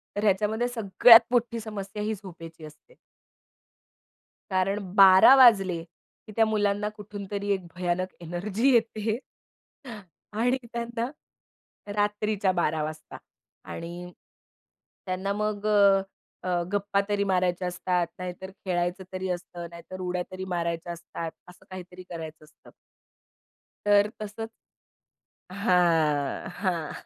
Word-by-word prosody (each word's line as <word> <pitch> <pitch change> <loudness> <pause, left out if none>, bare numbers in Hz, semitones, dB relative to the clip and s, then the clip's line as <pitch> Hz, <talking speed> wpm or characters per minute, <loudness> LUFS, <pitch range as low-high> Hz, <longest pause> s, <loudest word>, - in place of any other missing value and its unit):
तर 205 - -2
ह्याच्यामध्ये 215 +3 +1
सगळ्यात 230 0 +7
मोठी 240 -1 +1
समस्या 210 -2 -6
ही 215 +1 -1
झोपेची 165 -4 -11
असते. 155 - -16 1.6
कारण 190 +2 +1 0.2
12:00 195 +5 +9
वाजले, 195 -10 +5
की 170 +5 -20
त्या 225 - +4
मुलांना 210 -1 0
कुठूनतरी 205 -1 -6
एक 190 -2 -4
भयानक 180 +1 -2
एनर्जी 195 +9 0
येते. 220 -1 +1 1.2
आणि 245 +4 +1 0.2
त्यांना 235 0 -3 0.9
रात्रीच्या 210 -1 0
12:00 160 -3 0
वाजता 155 +1 -7 0.5
आणि 175 +1 -7 0.9
त्यांना 190 +2 -2
मग 210 0 -2
अ, 200 -2 +5 0.4
अ, 180 -1 0
गप्पा 200 0 +1
तरी 205 -1 +1
मारायच्या 180 -2 0
असतात, 180 -1 -1
नाहीतर 185 +1 -6
खेळायचं 180 0 -1
तरी 185 0 -3
असतं, 175 -1 -5
नाहीतर 170 +2 -10
उड्या 180 0 -2
तरी 185 0 -6
मारायच्या 170 0 -3
असतात. 165 -1 -7 0.2
असं 180 - -17
काहीतरी 185 -1 -9
करायचं 160 -2 -8
असतं. 150 - -20 1.2
तर 205 0 +4
तसंच 215 +1 -6 1.0
हां, 170 - +1
हां. 170 -6 -1
190 Hz, 110 wpm, -27 LUFS, 175-210 Hz, 1.6 s, 12:00